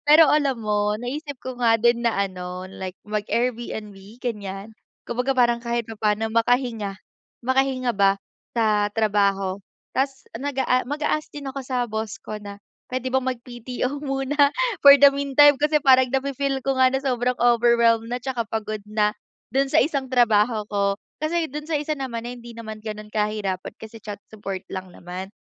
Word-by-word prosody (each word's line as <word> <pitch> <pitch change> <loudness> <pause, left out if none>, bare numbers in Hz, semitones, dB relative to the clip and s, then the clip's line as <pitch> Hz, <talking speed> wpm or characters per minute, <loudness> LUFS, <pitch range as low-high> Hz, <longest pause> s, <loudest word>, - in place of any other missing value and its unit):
Pero 305 +1 +8
alam 275 -4 +2
mo 210 -1 0
naisip 285 +4 -5
ko 255 -1 -6
nga 230 -2 +5
din 235 +1 +3
na 235 - +2
ano, 180 0 -7
like 185 -1 -7
mag-Airbnb, 215 0 -2 0.2
ganyan. 205 -3 -5 0.3
Kumbaga 250 +3 -1
parang 240 -1 +3
kahit 235 0 -2
papaano 220 0 0
makahinga, 230 -3 +1 0.5
makahinga 260 -1 +1
ba 195 -1 +3 0.4
sa 210 -2 +2
trabaho. 200 -3 +1 0.3
Tapos, 270 0 -1
nag-aa 265 -1 0
mag-a-ask 300 +1 -1
din 290 -1 -7
ako 270 +1 -5
sa 250 -1 -1
boss 220 -1 -4
ko 215 - -6
na 200 -1 -8 0.4
pwede 255 0 -1
bang 265 -1 +2
mag-PTO 250 +3 -5
muna 280 +1 +2 0.3
for 280 0 +11
the 280 0 +8
meantime, 280 +1 +5
kasi 300 0 +3
parang 260 -2 +5
nafe-feel 275 0 -1
ko 270 -1 0
nga 260 0 +4
na 265 - 0
sobrang 250 -2 0
overwhelmed 235 -1 +4
na 245 +1 -2
'tsaka 245 -2 -2
pagod 215 -1 -3
na, 210 0 +1 0.4
do'n 270 +2 +2
sa - - +6
isang 280 -4 0
trabaho 220 -2 +3
ko. 200 -1 0 0.2
Kasi 320 +1 0
do'n 295 +3 -6
sa 320 - +1
isa 300 +1 -2
naman 240 -4 -4
eh 245 - -6
hindi 235 0 -11
naman 220 -2 -8
gano'n 215 -1 -6
kahirapan 210 -3 -2
kasi 220 +1 -10
chat 205 -1 -6
support 195 -3 -6
lang 185 -1 -6
naman. 185 +3 -8
235 Hz, 165 wpm, -23 LUFS, 210-265 Hz, 0.5 s, for